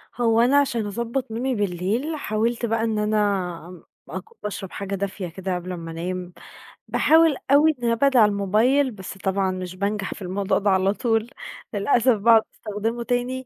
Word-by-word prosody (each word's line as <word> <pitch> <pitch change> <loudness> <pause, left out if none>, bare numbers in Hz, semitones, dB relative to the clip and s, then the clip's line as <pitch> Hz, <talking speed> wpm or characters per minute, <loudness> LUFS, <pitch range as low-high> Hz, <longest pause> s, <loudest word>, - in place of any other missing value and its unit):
هو 230 -1 +3
أنا 265 +4 +4
علشان 240 -6 +1
أضبَّط 235 +4 -3
نومي 250 +3 -1
بالليل، 205 - -1
حاولت 230 -2 -1
بقى 225 0 0
إن 220 -2 0
أنا 215 0 +1 0.5
ام 180 -1 -12 0.3
أك - - -5 0.2
باشرب 195 -2 -5
حاجة 200 0 -4
دافية 195 -1 -4
كده 185 +2 -4
قبل 180 +1 -5
أمّا 165 -2 -6
أنام. 180 +2 -5 0.5
باحاول 320 -2 +4
أوي 305 +2 +5
إن 235 - +2
أبعد 265 +2 +3
عن 210 -2 +6
الموبايل، 220 +8 +2
بس 190 -2 -9
طبعًا 190 0 0
مش 185 -1 -6
بانجح 200 +1 -2
في - - -13
الموضوع 190 +2 0
ده 200 0 +1
على 190 +1 +3
طول، 225 0 0 0.4
للأسف 230 +3 +3
باقعُد 225 +1 +5
استخدمه 225 +3 -3
تاني 245 +2 -2
215 Hz, 170 wpm, -23 LUFS, 195-240 Hz, 0.5 s, عن